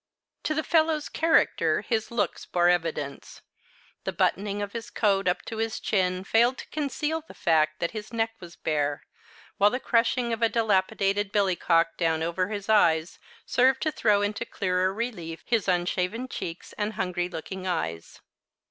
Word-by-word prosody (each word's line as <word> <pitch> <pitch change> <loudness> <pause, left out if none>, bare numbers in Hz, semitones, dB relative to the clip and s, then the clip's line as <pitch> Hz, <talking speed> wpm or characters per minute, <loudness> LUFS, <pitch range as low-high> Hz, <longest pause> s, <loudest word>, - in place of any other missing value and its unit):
To 310 - 0
the 315 - 0
fellow's 315 -2 +2
character 205 - +2
his 220 +1 -1
looks 235 -3 -1
bore 175 0 +3
evidence. 160 -5 -2 0.6
The - - -2
buttoning 200 +1 0
of 205 -1 -4
his 230 -2 -6
coat 195 -3 +1
up 180 - +1
to 225 - -6
his 225 0 -2
chin 185 -2 0
failed 235 +5 +3
to - - -8
conceal 300 +2 -2
the 320 - -15
fact 155 -2 +2
that 170 - -1
his 215 -1 -7
neck 225 -1 0
was 175 -1 -11
bare, 145 -2 -1 0.6
while 205 +1 +6
the 250 - -2
crushing 235 -1 +1
of 225 - -4
a 230 - +4
dilapidated 200 -2 +1
billycock 175 -4 +2
down 160 -2 +1
over 170 +3 0
his 205 -1 -5
eyes 170 -6 +3 0.3
served 260 +1 +3
to 310 - +1
throw 210 -7 +2
into 205 +2 -1
clearer 185 -4 0
relief 180 -7 -5
his 230 -5 +1
unshaven 180 +6 0
cheeks 170 -8 -6
and 210 +1 -1
hungry 180 -2 -2
looking 185 +3 -6
eyes. 85 - -3
200 Hz, 165 wpm, -27 LUFS, 175-230 Hz, 0.6 s, while